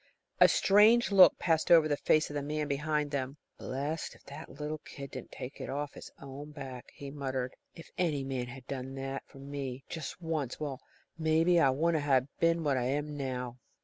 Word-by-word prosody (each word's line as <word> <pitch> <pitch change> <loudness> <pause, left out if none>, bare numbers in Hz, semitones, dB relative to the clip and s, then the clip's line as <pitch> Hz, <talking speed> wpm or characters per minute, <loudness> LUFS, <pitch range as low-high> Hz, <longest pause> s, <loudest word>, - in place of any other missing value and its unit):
A - - +9
strange 215 +4 +5
look 190 -2 +8
passed 160 -2 +1
over 165 -2 +7
the 145 - +1
face 155 +1 +2
of - - -7
the 145 - -1
man 150 +1 -2
behind 150 +1 -1
them. 135 0 -3 0.2
"Blessed 145 +5 -3
if - - -21
the 140 0 -9
little 150 +2 -5
kid 140 -2 -9
didn't - - -8
take 130 +3 -8
it - - -5
off 145 +1 -3
his - - -10
own 140 +2 -8
back," 135 -4 -8
he 140 -1 -8
muttered. 130 -3 -3 0.2
"If 165 - -12
any 155 -6 +1
man 130 -2 -3
had 130 +1 -9
ever 135 -2 -3
done 135 +1 -7
that 135 0 -4
for 140 - -16
me 135 -2 -5
just 160 +1 -5
once 160 -7 -3
well, 140 -4 -4 0.4
maybe, 165 +2 +4
I 140 - +5
wouldn't 155 +3 +1
ha' 130 -3 +4
been 165 0 +3
what 140 -3 +2
I 125 - 0
am 145 +3 -1
now!" 125 -3 -4
145 Hz, 205 wpm, -31 LUFS, 135-155 Hz, 0.4 s, A